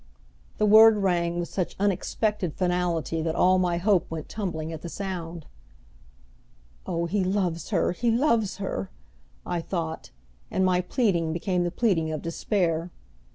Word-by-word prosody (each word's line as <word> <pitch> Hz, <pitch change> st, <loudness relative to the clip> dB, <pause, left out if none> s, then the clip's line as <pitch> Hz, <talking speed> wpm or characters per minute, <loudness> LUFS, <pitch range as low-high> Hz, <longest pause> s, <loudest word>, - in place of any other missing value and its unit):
The 215 Hz, -, +2 dB
word 220 Hz, +1 st, +8 dB
rang 175 Hz, -3 st, 0 dB
with 170 Hz, -, -2 dB
such 185 Hz, -3 st, -3 dB
unexpected 200 Hz, -2 st, -1 dB
finality 175 Hz, -3 st, 0 dB
that 160 Hz, 0 st, -1 dB
all 185 Hz, 0 st, +4 dB
my 175 Hz, -2 st, +1 dB
hope 185 Hz, -1 st, +2 dB
went 160 Hz, -2 st, -5 dB
tumbling 165 Hz, -6 st, -4 dB
at 160 Hz, -, -7 dB
the 170 Hz, -, -6 dB
sound. 170 Hz, -4 st, -5 dB, 1.4 s
"Oh, 170 Hz, 0 st, -1 dB
he 190 Hz, +3 st, 0 dB
loves 185 Hz, -3 st, -1 dB
her, 190 Hz, -6 st, +1 dB
he 230 Hz, +7 st, -1 dB
loves 230 Hz, -4 st, +2 dB
her!" 195 Hz, -1 st, -4 dB, 0.6 s
I 175 Hz, -1 st, -2 dB
thought 165 Hz, -2 st, -4 dB, 0.4 s
and 190 Hz, -, +1 dB
my 180 Hz, -1 st, +3 dB
pleading 175 Hz, -5 st, 0 dB
became 180 Hz, +1 st, 0 dB
the -, -, 0 dB
pleading 170 Hz, -6 st, +1 dB
of 155 Hz, -, -4 dB
despair. 165 Hz, -1 st, -1 dB
180 Hz, 150 wpm, -26 LUFS, 165-200 Hz, 1.4 s, word